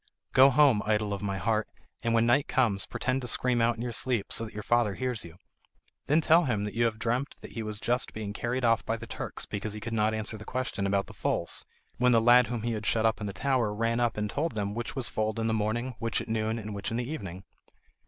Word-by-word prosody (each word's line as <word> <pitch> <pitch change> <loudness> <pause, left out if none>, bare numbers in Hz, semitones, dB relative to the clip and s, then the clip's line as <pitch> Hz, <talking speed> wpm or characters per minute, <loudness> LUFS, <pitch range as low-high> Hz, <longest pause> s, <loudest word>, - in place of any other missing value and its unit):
"Go 135 +1 +8
home, 135 -5 +5
idol 105 -1 +1
of 100 - -4
my 100 -1 -2
heart, 110 +3 0 0.3
and 115 0 +1
when 115 0 +4
night 130 +4 +3
comes, 105 -7 +2
pretend 130 +1 -1
to 125 - -5
scream 120 0 +1
out 115 0 +3
in 115 - -5
your 120 - -3
sleep, 120 -3 -1
so - - +1
that 110 - -10
your 105 - -5
father 120 -4 +2
hears 125 -4 -1
you. 85 0 -11 0.7
Then 155 +3 +4
tell 165 +2 +5
him 110 -6 0
that 105 -1 -4
you 120 +2 +2
have 110 -2 0
dreamt 120 +5 -1
that - - -10
he 115 - -5
was 105 -1 -4
just 125 +3 0
being 105 -2 -5
carried 120 +3 -1
off 115 -1 +3
by 115 - -1
the 115 - -8
Turks - - -6
because 105 +1 -4
he 105 - -6
could 115 +2 -5
not 110 0 +2
answer 110 0 -3
the - - -8
question 115 -5 -2
about 100 0 +1
the - - -12
foals, - - -2 0.3
when 125 0 +4
the 115 - +6
lad 120 +2 +6
whom 120 -3 -3
he 120 - 0
had 110 -1 -3
shut 115 -1 +2
up 110 0 +1
in 105 - -2
the - - -3
tower 120 +2 0
ran 115 +2 0
up 120 -2 +1
and 105 0 0
told 145 +7 -2
them 100 -2 -2
which 120 +4 -4
was 130 -4 -1
foaled 110 +1 -1
in 115 - -1
the 110 - +1
morning, 110 +4 -1
which 115 0 -1
at - - -6
noon, 110 0 -1
and 105 -1 -6
which 100 -1 -4
in 115 - -2
the 120 0 -2
evening." 95 - -6
115 Hz, 265 wpm, -29 LUFS, 105-120 Hz, 0.7 s, Go